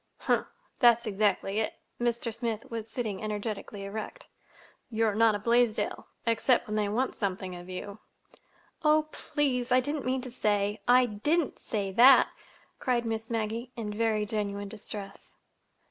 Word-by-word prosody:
"Humph! - - +1 0.3
That's 235 -2 +5
exactly 205 -1 +1
it!" 220 - -1 0.2
Mr. 235 -1 -1
Smith 230 -1 -3
was 225 -1 -5
sitting 220 -4 -3
energetically 210 -1 -4
erect. 220 - -6 0.6
"You're 220 -2 +1
not 220 0 +4
a - - 0
Blaisdell—except 235 +1 +1
when 215 -2 -4
they 210 -1 +1
want 250 +5 0
something 190 -2 -3
of 175 +1 -10
you!" 200 +3 -6 0.8
"Oh 305 0 +4
please, 255 -4 -1
I 255 - +6
didn't 290 +2 -2
mean 260 0 0
to 255 -1 -7
say—I 210 +3 +2
didn't 285 +9 0
say—that," 215 +5 +5 0.5
cried 245 -3 0
Miss 225 0 -3
Maggie, 230 +1 -2
in 215 -3 -4
very 215 -1 +1
genuine 205 -1 -3
distress. 205 -1 -8
220 Hz, 135 wpm, -29 LUFS, 205-245 Hz, 0.8 s, I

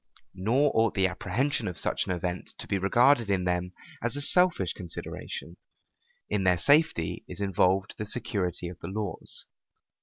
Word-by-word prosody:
Nor 115 +10 +2
ought 110 0 +2
the 95 -2 +3
apprehension 105 +7 -1
of 90 - -4
such - - 0
an - - -1
event 90 0 -4
to - - -5
be 100 - -1
regarded 120 +4 +4
in 95 -2 +1
them 90 0 -1 0.3
as 120 +3 -1
a 145 - -1
selfish 175 - +3
consideration: 85 -1 -7 0.7
in 105 -2 -1
their 90 -1 +4
safety 145 - +2
is - - -7
involved 95 0 +1
the 105 - -2
security 100 -7 -2
of 85 -1 -9
the - - -7
laws. 100 -2 -1
95 Hz, 160 wpm, -28 LUFS, 90-120 Hz, 0.7 s, regarded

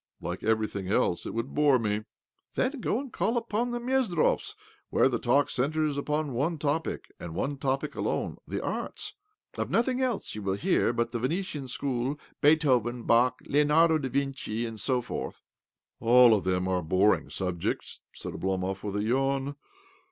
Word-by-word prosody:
" - - -56
Like 90 - -4
everything 110 -3 0
else, 95 -3 +1
it - - -5
would 115 +3 -3
bore 145 -3 +5
me." 105 -2 -1 0.2
" - - -48
Then 270 +2 0
go 225 - 0
and 270 -2 -7
call 220 +7 0
upon 235 +1 -1
the 240 0 -2
Mezdrovs, 240 -9 +1 0.3
where - - +4
the 120 -3 -1
talk 140 +4 +3
centres 150 +3 0
upon 150 0 -1
one 150 +7 0
topic, 150 +2 -2
and 85 -2 -7
one 140 +9 -1
topic 135 0 -1
alone— - - -2
the - - -3
arts. - - -3 0.5
Of - - -1
nothing 250 +2 +1
else 250 - -1
will 100 -3 -1
you - - -9
hear 185 -9 +2
but 120 0 -1
the 120 - -2
Venetian 150 +1 -2
School, 130 +2 -2 0.2
Beethoven, 130 -6 +3
Bach, 120 +3 +3
Leonardo 155 +3 +4
dA 135 -3 -3
Vinci, 130 -4 -2
and 115 -2 -6
so 125 +4 +1
forth." - - -6 0.3
" - - -63
All 120 0 +7
of 105 -4 +1
them 90 0 +1 0.2
boring 95 +5 +3
subjects! 90 -3 -3
" - - -58
said 90 - -6
Oblomov 95 +3 -2
with 100 -1 -4
a 105 - 0
yawn. 135 +4 0
130 Hz, 175 wpm, -28 LUFS, 110-155 Hz, 0.5 s, All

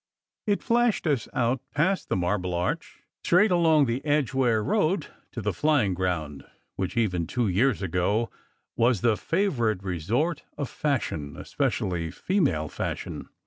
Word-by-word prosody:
It 205 -1 +1
flashed 240 -4 +2
us 140 -8 +1
out 120 +1 0
past 185 +6 +1
the - - +1
Marble 90 0 0
Arch, 95 - -3 0.2
straight 185 +5 +4
along 160 -4 +4
the 120 +2 -2
Edgware 135 -6 +2
Road, 185 - +1 0.3
to 120 - -6
the 105 -1 0
Flying 130 - +2
Ground, 85 -6 -2 0.3
which, 95 +3 -3
even 90 -8 +1
two 120 -2 0
years 105 +3 +2
ago, 95 +6 0 0.4
was 115 -3 +2
the 115 -2 +3
favourite 120 - 0
resort 115 - -1 0.2
of 140 - -3
fashion, 80 - -2
especially 85 -3 -1
female 95 - 0
fashion. - - -5
120 Hz, 140 wpm, -26 LUFS, 90-150 Hz, 0.4 s, straight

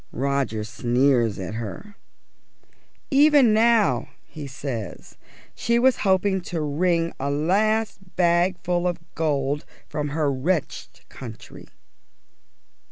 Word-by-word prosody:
Roger 135 -4 -1
sneers 120 0 +1
at 95 +3 -5
her. 115 - -7 1.2
"Even 285 -4 +6
now," 220 - +3 0.2
he 150 -3 -9
says, 130 -6 -6 0.4
"she 235 +1 0
was 255 +1 +4
hoping 190 0 +1
to 170 -1 -4
wring 165 +3 0
a 140 - -2
last 195 +6 0
bag 175 +1 +2
full 180 0 0
of 175 - -1 0.2
gold 145 -2 -1 0.2
from 150 -1 -3
her 145 0 0
wretched 155 +5 -3
country." 115 -4 -11
160 Hz, 105 wpm, -24 LUFS, 135-190 Hz, 1.2 s, Even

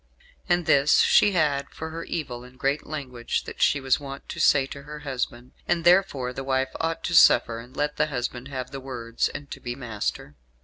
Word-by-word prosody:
And 175 -1 +2
this 140 +1 +5
she 205 - +5
had 145 -5 +1
for 160 0 -7
her 165 +1 -5
evil 125 -7 -4
and 125 +1 -15
great 140 +2 -1
language 130 -6 -3
that - - -9
she 140 - +4
was 135 -2 +1
wont 140 -1 -8
to - - -6
say 140 -2 +4
to 140 +1 -9
her 150 +1 -9
husband. 125 -3 -4 0.2
And 170 -1 +1
therefore 170 -9 +3
the 135 - -5
wife 130 0 0
ought 165 0 -2
to 175 - -2
suffer, 115 -7 +6
and 120 +3 -13
let 150 0 -1
the 150 - +2
husband 125 -2 -4
have 130 -2 -5
the 135 - -6
words, 120 -3 -2
and 145 -1 -9
to - - -6
be 120 0 -5
master." 115 - -4
135 Hz, 210 wpm, -25 LUFS, 125-150 Hz, 0.2 s, suffer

